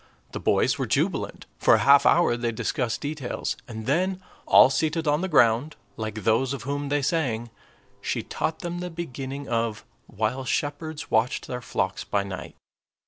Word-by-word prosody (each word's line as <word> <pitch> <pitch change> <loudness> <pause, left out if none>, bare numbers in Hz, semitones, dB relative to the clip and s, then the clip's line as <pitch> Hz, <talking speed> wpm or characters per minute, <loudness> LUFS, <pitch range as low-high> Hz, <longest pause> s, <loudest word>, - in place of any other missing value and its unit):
The - - -5
boys - - +2
were - - -1
jubilant; - - -1
for - - +6
a - - 0
half 140 0 +7
hour 170 -8 +4
they 120 -1 -1
discussed 120 +1 -2
details; 145 -3 -3
and 110 -2 -7
then, 180 +8 +1 0.3
"all 130 - +7
seated 160 +3 0
on 150 +2 +2
the 190 - -1
ground," 135 -2 +3 0.2
like 110 -1 -5
those 125 +4 +2
of 140 - -5
whom 140 +2 -3
they 145 0 +1
sang, 120 -7 -1 0.5
she - - -2
taught 160 - -3
them 175 0 -4
the 180 0 -4
beginning 140 -4 -6
of, 115 -2 -1 0.2
"While 110 +5 -2
shepherds 150 +3 -3
watched 115 +3 +1
their 125 0 -5
flocks 95 -5 -2
by 100 -1 0
night." 95 -2 -7
135 Hz, 170 wpm, -25 LUFS, 115-155 Hz, 0.5 s, half